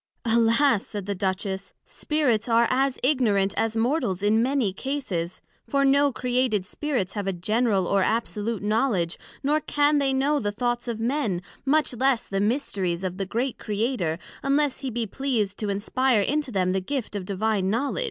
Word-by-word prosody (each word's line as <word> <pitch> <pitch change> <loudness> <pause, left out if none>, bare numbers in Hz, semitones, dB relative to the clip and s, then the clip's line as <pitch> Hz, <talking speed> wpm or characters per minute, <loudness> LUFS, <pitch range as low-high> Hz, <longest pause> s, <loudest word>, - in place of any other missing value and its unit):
Alas! 230 +1 +3
said 205 -3 -5
the 200 - -2
Duchess, 190 0 -3
Spirits 255 -7 0
are 230 +1 +5
as 265 +1 +1
ignorant 215 -8 +2
as 225 0 0
Mortals 225 - 0
in 215 +2 +3
many 255 -6 +1
cases; 195 -9 -3 0.2
for 275 0 +2
no 280 +1 +4
created 245 -5 0
Spirits 250 -3 -2
have 205 -2 -3
a - - +2
general 205 +2 +1
or 200 +2 +2
absolute 220 0 -1
knowledg, 210 -5 +1 0.3
nor 300 +3 +2
can 290 0 +2
they 275 -1 +2
know 280 +3 +2
the 205 -4 -1
Thoughts 240 +2 -2
of 230 -2 -3
Men, 230 -6 0 0.3
much 300 0 +3
less 260 0 +1
the 195 0 -1
Mysteries 200 -6 -1
of 185 -1 -3
the 195 -1 -3
great 240 +5 -2
Creator, 210 -6 -1 0.2
unless 280 0 +1
he 270 - -3
be 235 -1 -2
pleased 220 -4 -2
to 210 - -2
inspire 225 +4 +1
into 295 +6 0
them 185 -3 +1
the 190 0 0
gift 250 +1 -4
of 200 - -3
Divine 200 0 0
Knowledg. 255 - -1
225 Hz, 170 wpm, -25 LUFS, 200-270 Hz, 0.3 s, are